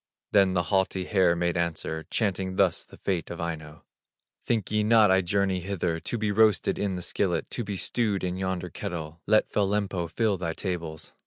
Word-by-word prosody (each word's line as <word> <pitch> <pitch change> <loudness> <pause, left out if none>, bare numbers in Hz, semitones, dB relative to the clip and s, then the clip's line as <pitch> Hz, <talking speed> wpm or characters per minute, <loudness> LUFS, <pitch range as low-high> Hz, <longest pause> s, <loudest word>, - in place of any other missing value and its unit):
Then 95 -2 +4
the 90 - +2
haughty 95 -1 +1
hare 95 -4 +3
made 85 0 0
answer, 80 -2 -2
Chanting 95 -4 -1
thus 95 -3 +2
the - - -16
fate 90 -5 -2
of 85 - -6
Aino: 80 -2 -5 0.6
"Think 110 -5 0
ye 105 0 +2
not 110 -2 +5
I 95 0 +5
journey 95 0 +1
hither, 90 -3 -2
To 120 - -3
be 110 -2 0
roasted 110 0 +3
in 100 -2 -1
the 90 - -5
skillet, 90 -1 -1
To 120 - -3
be 100 -2 -4
stewed 105 -1 0
in 90 -1 -1
yonder 95 -2 -3
kettle; 85 -5 -6
Let 110 - +3
fell 100 -2 +2
Lempo 100 -4 -1
fill 105 +2 +1
thy 85 -2 -2
tables! 85 -5 -5
95 Hz, 190 wpm, -27 LUFS, 85-100 Hz, 0.6 s, not